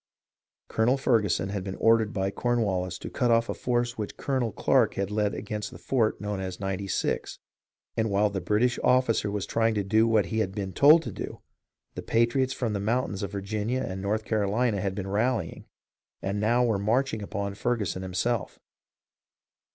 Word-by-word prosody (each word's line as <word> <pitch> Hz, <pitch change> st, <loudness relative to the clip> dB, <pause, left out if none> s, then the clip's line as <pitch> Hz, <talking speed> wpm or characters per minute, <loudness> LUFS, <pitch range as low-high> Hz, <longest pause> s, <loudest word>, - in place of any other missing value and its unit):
Colonel 120 Hz, +4 st, +2 dB
Fer 125 Hz, -4 st, +3 dB
guson 95 Hz, -1 st, -1 dB
had 100 Hz, -2 st, -3 dB
been 95 Hz, 0 st, -5 dB
ordered 115 Hz, -2 st, +3 dB
by 95 Hz, -2 st, -1 dB
Cornwallis 100 Hz, -7 st, -1 dB
to -, -, -7 dB
cut 125 Hz, -3 st, 0 dB
off 115 Hz, 0 st, +3 dB
a -, -, 0 dB
force 120 Hz, -1 st, -1 dB
which 105 Hz, -, -5 dB
Colonel 130 Hz, -5 st, -1 dB
Clarke 120 Hz, -2 st, +2 dB
had 100 Hz, +1 st, -2 dB
led 105 Hz, -1 st, 0 dB
against 105 Hz, 0 st, -4 dB
the -, -, -11 dB
fort 115 Hz, -5 st, 0 dB
known 105 Hz, -1 st, -3 dB
as 95 Hz, -1 st, -5 dB
Ninety 95 Hz, 0 st, -3 dB
Six, -, -, -2 dB, 0.6 s
and 110 Hz, 0 st, 0 dB
while 100 Hz, +1 st, +2 dB
the 95 Hz, -2 st, -3 dB
British 120 Hz, +4 st, +1 dB
officer 125 Hz, -4 st, +3 dB
was 100 Hz, -1 st, -2 dB
trying 115 Hz, -1 st, +1 dB
to 105 Hz, -, 0 dB
do 110 Hz, +4 st, +3 dB
what 110 Hz, -4 st, +3 dB
he 110 Hz, +6 st, -2 dB
had 95 Hz, -3 st, -1 dB
been 95 Hz, -3 st, -4 dB
told 155 Hz, +4 st, +7 dB
to -, -, -5 dB
do, -, -, -7 dB, 0.5 s
the -, -, -6 dB
patriots 120 Hz, +3 st, +1 dB
from 120 Hz, -5 st, -2 dB
the 100 Hz, -, -1 dB
moun 115 Hz, +5 st, 0 dB
tains 100 Hz, -, -5 dB
of 100 Hz, -1 st, -3 dB
Virginia 105 Hz, +5 st, -2 dB
and 95 Hz, 0 st, -5 dB
North 105 Hz, +2 st, -1 dB
Carolina 105 Hz, 0 st, +1 dB
had 95 Hz, 0 st, -2 dB
been 95 Hz, -2 st, -4 dB
rallying, 110 Hz, -2 st, -1 dB, 0.5 s
and 100 Hz, +1 st, -2 dB
now 120 Hz, +4 st, +3 dB
were 110 Hz, -4 st, +1 dB
marching 115 Hz, +2 st, 0 dB
upon 100 Hz, 0 st, -3 dB
Ferguson 105 Hz, -3 st, -1 dB
himself. 95 Hz, +3 st, -2 dB
105 Hz, 190 wpm, -27 LUFS, 100-120 Hz, 0.6 s, told